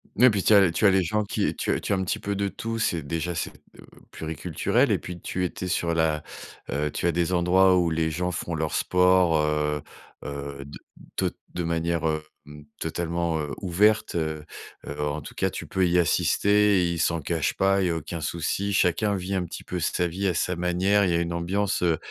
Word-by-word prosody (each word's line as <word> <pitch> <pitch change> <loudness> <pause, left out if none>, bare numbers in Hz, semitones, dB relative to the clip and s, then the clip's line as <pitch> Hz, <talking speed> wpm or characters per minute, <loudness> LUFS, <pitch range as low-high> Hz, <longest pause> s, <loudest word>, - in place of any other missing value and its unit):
Ouais 125 +4 +7
et - - +7
puis 100 -3 0
tu 110 - +4
as 95 -4 +6
tu 105 - 0
as 100 - +7
les 95 -1 +3
gens 105 +5 0
qui 100 - -1
tu - - -1
as - - +1
tu - - -4
as 100 - +4
un 95 - -1
petit 90 - -2
peu 100 0 -3
de 100 0 0
tout, 115 +3 -4
c'est 85 -7 0
déjà 85 +4 -3
c'est, 80 - -3
d - - -21 0.2
heu, - - -13 0.3
pluriculturel 80 -1 0
et - - +2
puis, 90 0 -8
tu 90 +1 -3
étais 90 +1 -3
sur 85 -2 0
la 80 -2 +1 0.5
heu, 75 +1 -1
tu 85 - -1
as - - +3
des 85 +2 0
endroits 90 +2 +4
où 85 -1 +2
les 80 0 0
gens 90 +3 -1
font 85 0 -4
leur 80 -1 -2
sport, 90 -2 +3
heu 75 -1 0 0.4
heu, 70 -1 -6
de 70 - -10 0.4
tot - - 0 0.2
de 90 - -1
manière, 85 0 -1 0.4
hem, 75 0 -12
totalement, 85 0 -2
heu, 75 -1 -4
ouverte, 105 +4 +2
heu 80 -2 -2 0.4
heu, 75 +1 -5
en 75 +1 -2
tout - - -10
cas, - - +1
tu - - -6
peux 95 -1 +1
y 85 - +2
assister 100 +3 +3
et 85 - +1
ils 85 - -3
s'en 85 0 +1
cachent 80 +1 -1
pas. 95 0 +2
Il 90 - +2
y - - 0
a 85 - 0
aucun 80 +1 -5
souci. 85 +6 -2
Chacun 100 +2 +2
vit 95 +1 -4
un 90 - 0
petit - - -8
peu - - -4
sa 90 - 0
vie 95 +4 -2
à 90 - +1
sa 90 - 0
manière. 90 +4 +2
Il 90 - +1
y - - +2
a - - +2
une 85 0 -2
ambiance, 95 +4 -1
heu 85 -2 +2
85 Hz, 235 wpm, -25 LUFS, 80-95 Hz, 0.5 s, Ouais